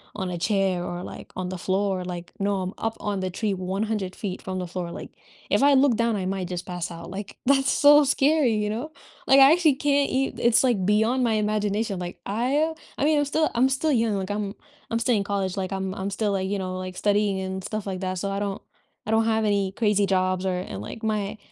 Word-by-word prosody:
on 190 -3 -3
a 175 - -3
chair 190 0 +1
or, 175 +1 -5
like, - - -10
on 185 -1 -3
the 185 - -4
floor, 190 0 -1
like, 175 -1 -6
no, 200 -1 0
I'm 185 +1 -4
up 225 0 -2
on 205 -2 -2
the 185 0 -2
tree 200 +2 -2
100 190 +1 -2
feet 195 -4 -5
from 185 -1 -4
the 180 - -4
floor, 175 -1 -4
like, - - -8 0.4
if - - +2
I 285 +1 +6
look 265 -4 +4
down, 230 -1 +1
I 190 -2 -2
might 190 -1 -2
just 180 0 -5
pass 180 -1 -4
out, 170 0 -8
like, 195 +1 -7
that's 270 0 +3
so 295 +1 +7
scary, 280 -2 +3
you 210 0 0
know? 240 +9 -4 0.4
Like, 270 - +7
I 270 - +9
actually 320 -4 +4
can't 285 0 +2
e 270 +1 0
it's 235 +2 +4
like 220 -8 +2
beyond 220 +5 +2
my 230 - +2
imagination, 210 -1 0
like, 175 0 -6
I 270 +10 0 0.2
I - - -1
mean, 305 0 +3
I'm 290 - +2
still 310 +2 +1
I'm 255 +3 +4
still 280 +4 +1
young, 230 -4 +2
like, 190 0 -4
I'm 205 -1 -3 0.4
I'm 230 - +1
still 240 +1 +2
in 200 - +1
college, 195 -2 -2
like, 190 0 -2
I'm 190 -1 -3
I'm 195 +1 -3
still, 205 +1 -1
like, 190 -1 -1
you 205 - -1
know, 185 0 -4
like, 185 0 -6
studying 205 -2 +1
and 190 0 -4
stuff 215 -2 -4
like 190 -1 -3
that 185 0 -2
so 195 +2 -2
I 195 - -2
don't 200 0 -3 0.4
I 215 - -3
don't 220 0 +3
have 220 -1 +1
any 200 -2 +1
crazy 210 -2 +2
jobs 185 -1 0
or 185 -1 0
and, 100 - -7
like, 115 - -8
my 215 -1 -1
205 Hz, 245 wpm, -25 LUFS, 185-230 Hz, 0.4 s, I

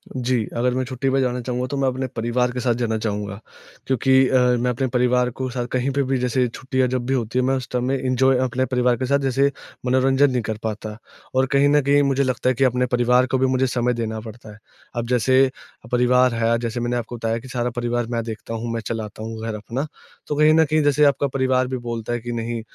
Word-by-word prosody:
जी, 125 -3 0
अगर 125 +1 +1
मैं 130 - 0
छुट्टी 130 +1 -2
पे 135 +1 +2
जाना 125 -1 0
चाहूँगा, 125 +1 -2
तो 140 +1 -4
मैं 135 -1 +1
अपने 130 +1 -1
परिवार 125 0 -1
के 125 - -4
साथ 125 -1 +1
जाना 115 -2 -1
चाहूँगा 105 -2 -3 0.5
क्योंकि 130 +1 +3
अ, 130 - +3 0.2
मैं 125 +1 0
अपने 125 +2 -1
परिवार 125 0 +2
को 130 +1 -4
साथ 125 0 -3
कहीं 130 +2 0
पे 140 +1 +1
भी 135 0 0
जैसे 125 0 +1
छुट्टियाँ 130 +2 -1
जब 125 -1 -2
भी 130 - 0
होती 125 -1 -1
हैं, 130 - +1
मैं 135 +1 +2
उस 130 - -6
टाइम 125 -1 -1
में 135 - +1
एन्जॉय 130 0 +2
अपने 130 +1 0
परिवार 125 -1 +1
के 130 - -2
साथ 140 +2 +2
जैसे 135 +1 +1 0.3
मनोरंजन 135 +2 +3
नहीं 125 - 0
कर 110 -1 -4
पाता। 110 -1 -4 0.4
और 130 0 +4
कहीं 140 +1 +4
न 145 0 +4
कहीं 140 +1 +3
मुझे 140 0 +2
लगता 130 -1 0
है 130 - +1
कि, 135 - +1
अपने 125 -1 +2
परिवार 125 0 +3
को 130 +1 0
भी 130 - +2
मुझे 130 0 +1
समय 125 0 0
देना 110 -1 -3
पड़ता 110 0 -11
है। 105 - -13 0.4
अब 120 0 -2
जैसे 130 +2 +4 0.4
अ, - - -12
परिवार 125 0 +3
है, 115 0 +1
जैसे 115 0 -3
मैंने 120 0 -1
आपको 120 0 -5
बताया 115 0 -1
कि 130 - -12
सारा 125 -1 -2
परिवार 120 -1 -1
मैं 115 -1 -1
देखता 115 0 -7
हूँ, 115 +1 -4
मैं 115 - -2
चलाता 110 -1 -5
हूँ 110 0 -6
घर 110 -1 -3
अपना, 115 +8 -4 0.4
तो 150 - -2
कहीं 150 +1 +5
न 160 0 +5
कहीं 155 +1 +1
जैसे 145 +1 +3
आपका 140 0 +2
परिवार 130 -1 +2
भी 130 0 -3
बोलता 115 0 -3
है 120 - -1
कि, 120 +1 -6
"नहीं, 115 0 -3
125 Hz, 250 wpm, -22 LUFS, 120-130 Hz, 0.5 s, कहीं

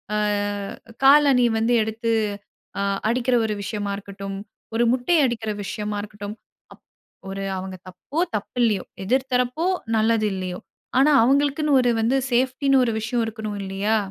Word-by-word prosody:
ஆ - - +1 0.9
காலணி 275 -3 +6
வந்து 225 +2 +2
எடுத்து 225 +2 -2 0.7
அ - - 0 0.3
அடிக்கிற 250 +1 +1
ஒரு 215 - -1
விஷயமா 205 -1 -3
இருக்கட்டும், 195 -1 -7 0.4
ஒரு 235 - +3
முட்டை 255 +7 +2
அடிக்கிற 225 -3 -2
விஷயமா 210 +1 -4
இருக்கட்டும், 205 0 -7 0.4
அப் - - -22 0.5
ஒரு 195 0 -4
"அவங்க 190 0 -6
தப்போ 185 - -6 0.2
தப்பு 210 +3 -5
இல்லையோ, 210 -5 +1 0.2
எதிர் 260 +5 +1
தரப்போ 250 +7 +1 0.3
நல்லது 220 0 +2
இல்லையோ 185 -1 -4 0.4
ஆனா 290 +3 +5
அவர்களுக்குனு 285 +4 +2
ஒரு 245 -1 +2
வந்து 240 +4 +2
சேஃப்டின்னு 260 +2 +2
ஒரு 235 - +1
விஷயம் 230 +2 -1
இருக்ணும்" 215 -1 -5
இல்லையா? 195 +3 0
225 Hz, 140 wpm, -23 LUFS, 205-255 Hz, 0.9 s, காலணி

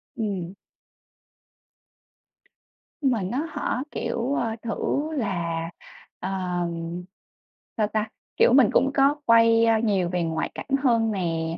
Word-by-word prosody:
Ừm. 190 -5 -3 2.5
Nhưng 270 -3 +3
mà 230 -4 0
nó 250 - -2
hả, 255 -4 -2
kiểu, 235 +3 -2
ơ, 225 -5 -1
thử 240 +6 -1
là, 170 - -2 0.5
ờ, 185 - -4 1.5
sao 215 -2 +2
ta, 215 0 -2 0.3
kiểu, - - +5
mình 255 -5 +6
cũng 270 - +3
có 275 +1 +4
quay 230 0 +5 0.2
nhiều 195 -5 +1
về 180 -1 -1
ngoại 160 -1 -2
cảnh - - -7 0.2
hơn 230 -4 +3
nè, 165 -4 -2
220 Hz, 120 wpm, -25 LUFS, 180-240 Hz, 2.5 s, mình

